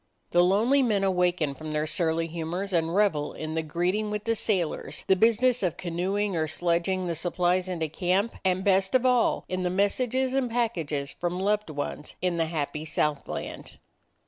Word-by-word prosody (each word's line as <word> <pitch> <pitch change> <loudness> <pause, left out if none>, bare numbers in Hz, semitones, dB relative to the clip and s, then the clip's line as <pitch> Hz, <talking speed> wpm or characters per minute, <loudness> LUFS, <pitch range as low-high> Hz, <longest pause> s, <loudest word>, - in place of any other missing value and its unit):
The 175 0 +5
lonely 220 +10 +3
men 210 -6 +1
awaken 180 -5 +1
from 155 +2 -7
their 150 0 0
surly 160 +1 0
humors 170 +4 -4
and 165 0 +1
revel 175 -8 +2
in 155 0 -5
the 160 - 0
greeting 180 +7 -1
with 210 0 -3
the 230 - +1
sailors, 195 -7 -2
the 190 - +4
business 230 +5 +3
of 180 -5 -1
canoeing 185 +3 -1
or 160 -1 0
sledging 175 +3 0
the 170 - -1
supplies 180 +2 0
into 165 -3 -2
camp, 185 +7 0
and, 185 0 +1
best 190 +2 +2
of 255 0 +3
all, 250 -2 +3
in 185 0 -2
the 180 - 0
messages 250 +7 +1
and 265 -2 +1
packages 165 -12 -1
from 175 +1 -3
loved 210 0 0
ones 145 0 -5
in 180 -2 0
the 165 -1 +1
happy 150 -1 -3
Southland. 150 -2 -3
180 Hz, 175 wpm, -27 LUFS, 165-205 Hz, -, The